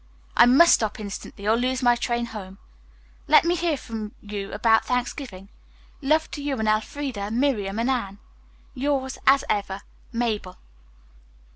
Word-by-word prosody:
"I 240 - +7
must 285 +8 +7
stop 220 -1 0
instantly 200 0 -7
or 220 - +4
lose 255 +2 -1
my 240 -1 +5
train 235 0 -1
home. 195 -4 -9 0.7
Let - - +6
me 340 - +3
hear 335 -3 0
from 220 -4 -7
you 205 -1 -6
about 225 +2 +3
Thanksgiving. 245 -5 -3 0.5
Love 310 +3 +1
to 290 - -6
you 285 -2 -2
and 220 - -1
Elfreda, 215 0 -1
Miriam 225 -5 0
and 230 +2 0
Anne. 200 -6 -2 0.6
"Yours, 265 -1 -2
as 270 +1 +6
ever, 200 -1 -2 0.3
"MABEL. 220 -6 -2
235 Hz, 145 wpm, -24 LUFS, 205-265 Hz, 0.7 s, I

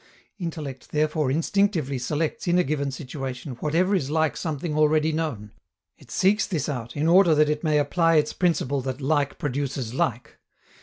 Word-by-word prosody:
Intellect 155 -7 -6
therefore 150 -1 0
instinctively 160 -2 +1
selects 155 - -2
in 175 +1 +3
a 180 - +4
given 140 0 -1
situation 135 -1 -6
whatever 170 +6 +1
is 145 -9 0
like 160 0 +1
something 155 -1 -3
already 155 +1 +3
known; 150 -10 -3 0.4
it - - -20
seeks 205 +3 +2
this 160 -8 -2
out, 120 -5 -5
in 150 +2 +1
order 175 -1 +6
that 150 0 +4
it 150 +1 -3
may 155 -2 +2
apply 165 +3 +2
its 150 -1 +2
principle 145 -6 0
that 130 +1 -4
"like 145 0 0
produces 135 -4 -3
like." 125 -2 -2
150 Hz, 165 wpm, -25 LUFS, 135-165 Hz, 0.4 s, order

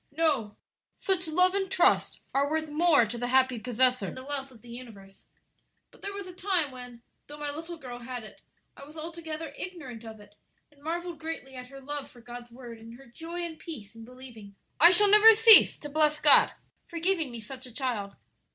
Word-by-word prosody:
"No; 275 -11 0 0.4
such 365 -3 -1
love 365 +4 +2
and 390 -1 -2
trust - - +1
are 280 +1 +1
worth 315 0 -3
more 305 -4 +3
to 235 +2 -7
the 245 - -3
happy 260 -1 +1
possessor 250 -2 0
than - - -8
the 260 0 -10
wealth 275 -1 -4
of 245 -4 -20
the 240 - -15
universe. 210 -6 -13 0.7
But - - -22
there 400 - -5
was 400 -1 -7
a 365 - -11
time 360 -6 -1
when, 245 -2 -12 0.2
though 295 - -11
my 295 -1 -5
little 325 +3 -8
girl 250 -5 -10
had 245 -1 -8
it, 215 - -15 0.3
I - - -13
was 300 +3 -14
altogether 325 0 -8
ignorant 275 -11 -8
of 220 -1 -11
it, 205 0 -18 0.4
and 285 -1 -26
marvelled 340 +1 -5
greatly 320 -4 -7
at 250 0 -9
her 275 +1 -13
love 290 +1 -7
for 245 - -18
God's 240 0 -11
word 235 -1 -12
and 230 +1 -13
her 270 +2 -16
joy 330 +8 -8
and 335 -2 -7
peace 235 - -10
in 225 0 -13
believing. 235 -5 -14 0.2
I 340 - +9
shall 410 +3 +4
never 425 +2 +7
cease 445 0 +8
to 295 - -9
bless 300 0 +1
God 295 - +6 0.4
for 340 - -9
giving 335 -3 -1
me 235 -1 -9
such 255 +4 -10
a - - -14
child." 230 -6 -4
275 Hz, 210 wpm, -27 LUFS, 240-330 Hz, 0.7 s, I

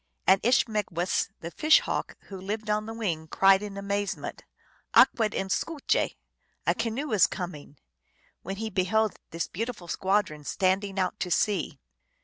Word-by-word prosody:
And 190 +1 +5
Ishmegwess, 210 -8 +1
the 170 - -6
Fish 310 - +5
Hawk, - - -3
who 190 -2 -10
lived 215 +2 -3
on 215 +1 0
the 225 - -5
wing, 170 -8 -2
cried 195 +3 +5
in 205 -1 -6
amazement, 200 0 -3 0.3
" - - -36
Akweden 210 -4 +4
skouje! 315 +4 0 0.2
" - - -46
" - - -45
A - - +3
canoe 235 +5 -3
is 210 -4 +5
coming! 150 -5 -7 0.3
" 65 - -38
when 195 - -5
he 220 +2 -4
beheld 210 +3 +1
this 165 0 -3
beautiful 220 -3 -5
squadron 190 -6 0
standing 190 +4 0
out 185 +2 -1
to 180 - -2
sea. 185 0 0
200 Hz, 160 wpm, -27 LUFS, 185-220 Hz, 0.3 s, And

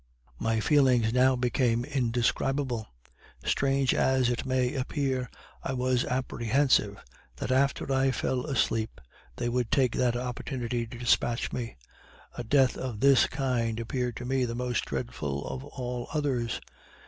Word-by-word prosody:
My 115 0 +1
feelings 125 -4 +3
now 130 +1 +4
became 120 -1 +1
indescribable. 125 -2 0 0.6
Strange 135 -1 +2
as 130 -2 +2
it 120 +2 -3
may 130 0 +1
appear, 130 -2 -1 0.3
I 135 - -3
was 125 -1 +1
apprehensive 125 -3 +1 0.4
that 95 - -4
after 135 +1 +1
I 135 0 +3
fell 130 +1 -1
asleep 115 - 0 0.4
they 120 - -2
would 120 -1 0
take 130 -4 +2
that 125 -2 +2
opportunity 125 -1 -3
to 120 +1 -9
despatch 120 0 +1
me; 115 - -4 0.6
a 120 - -4
death 130 +2 +3
of 125 -5 -4
this 135 0 +5
kind 120 -4 -1
appeared 125 +1 -2
to 120 - -6
me 130 0 +1
the 120 -1 -2
most 125 0 -1
dreadful 70 +3 -3
of 130 - -5
all 125 -3 -5
others. 130 -7 -1
125 Hz, 140 wpm, -28 LUFS, 120-130 Hz, 0.6 s, this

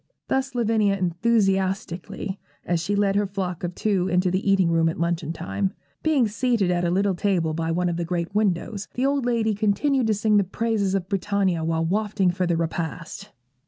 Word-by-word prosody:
Thus 265 -1 -1
Lavinia 220 -4 +2
enthusiastically, 190 -1 0 0.3
as 175 -1 +1
she 205 +4 -1
led 200 -1 +2
her 205 0 +2
flock 185 -3 -4
of 175 0 -3
two 195 -4 +1
into 180 0 +2
the 195 +2 +1
eating 190 -4 +3
room 165 0 +3
at 160 - -5
luncheon 170 -1 -1
time. 95 - -2 0.3
Being 290 -7 +3
seated 220 -3 +1
at 175 0 0
a 175 - +1
little 195 +2 +2
table 175 -4 0
by 165 +1 -2
one 175 +2 0
of 170 -1 -1
the 175 - -1
great 170 +1 -3
windows, 205 0 0
the 255 - 0
old 275 -2 +1
lady 225 -3 +1
continued 220 +6 +1
to 215 - +2
sing 210 +1 +2
the 200 - +4
praises 200 0 -1
of 185 -2 -2
Britannia 195 -3 0
while 165 0 0
wafting 200 0 +1
for 180 0 -1
the 170 -1 +1
repast. 165 +4 -4
195 Hz, 195 wpm, -24 LUFS, 175-210 Hz, 0.3 s, the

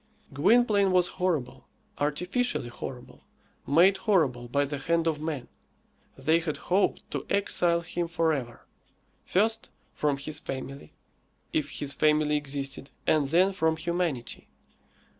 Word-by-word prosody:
Gwynplaine 200 - +4
was 180 -1 +4
horrible 145 -8 -1 0.3
artificially 180 - -1
horrible 125 +1 -8 0.5
made 175 +7 +5
horrible 145 - +1
by 140 +4 +1
the 145 0 -4
hand 165 +4 +1
of 155 -2 0
man. 150 -6 -4 0.7
They 160 +1 +3
had 160 -3 -3
hoped 190 +3 +1
to - - -3
exile 175 -4 +2
him 170 +1 -3
for 165 -1 +1
ever: 120 -5 -5 0.6
first, 220 +4 +1 0.2
from 145 -2 0
his 145 +2 -5
family, 135 - -7 0.6
if 150 -1 0
his 140 0 -3
family 150 +1 +3
existed, 140 -1 -3 0.2
and 150 -3 +3
then 180 +6 +3
from 160 -3 +1
humanity. 165 -7 -2
155 Hz, 125 wpm, -28 LUFS, 140-180 Hz, 0.7 s, made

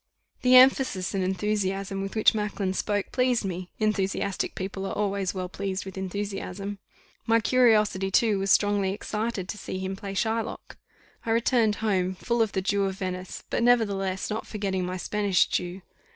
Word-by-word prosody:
The 250 0 +5
emphasis 255 -7 +5
and 195 -1 0
enthusiasm 195 0 -1
with 195 +2 -5
which 220 - +5
Macklin 210 -3 -2
spoke, 205 +1 -1
pleased 250 -4 +1
me 180 -1 -4
enthusiastic 200 -2 -1
people 195 +1 -4
are - - -4
always 200 -2 -1
well 185 -1 -3
pleased 190 +1 -4
with 190 - -8
enthusiasm. 195 +1 -4 0.5
My 230 0 +4
curiosity 215 -5 +3
too 210 +1 +3
was 195 +1 -1
strongly 200 -1 +3
excited 210 -1 -3
to 210 - -5
see 185 - -5
him 190 +1 -3
play 195 0 -7
Shylock. 225 +2 -2 0.5
I - - -5
returned 230 -1 +3
home 185 -3 +1
full 235 +5 -1
of 220 -3 +1
the 190 - -1
Jew 200 +1 +1
of 190 -1 -2
Venice; 185 -1 -5
but, - - 0
nevertheless, 200 -6 +1
not 215 - -3
forgetting 195 -4 -2
my 185 +1 -3
Spanish 200 -1 +2
Jew. 180 +1 -3
200 Hz, 165 wpm, -26 LUFS, 190-215 Hz, 0.5 s, The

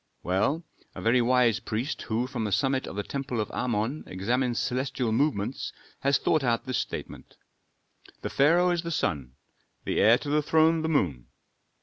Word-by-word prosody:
"Well, 105 - 0 0.3
a - - -6
very 120 +2 +4
wise 120 -2 +3
priest 120 +6 -3
who 115 +2 -1
from 125 -3 -4
the 105 - -2
summit 135 +3 +1
of - - -7
the 105 - -2
temple 135 0 -4
of 105 - -2
Amon 120 +4 -1
examines 120 +6 -1
celestial 125 -1 -1
movements, 120 -2 0 0.3
has 140 0 +3
thought 155 -3 +1
out 120 -2 0
this 130 - -1
statement: - - -6 0.9
'The - - -2
pharaoh 170 +6 +4
is 175 -1 0
the 170 - -5
sun, 70 - -2 0.5
the - - 0
heir 115 +3 +6
to 145 - -6
the 150 +1 +3
throne 160 +2 +3
the 160 - -1
moon. 85 - 0
125 Hz, 175 wpm, -27 LUFS, 110-145 Hz, 0.9 s, heir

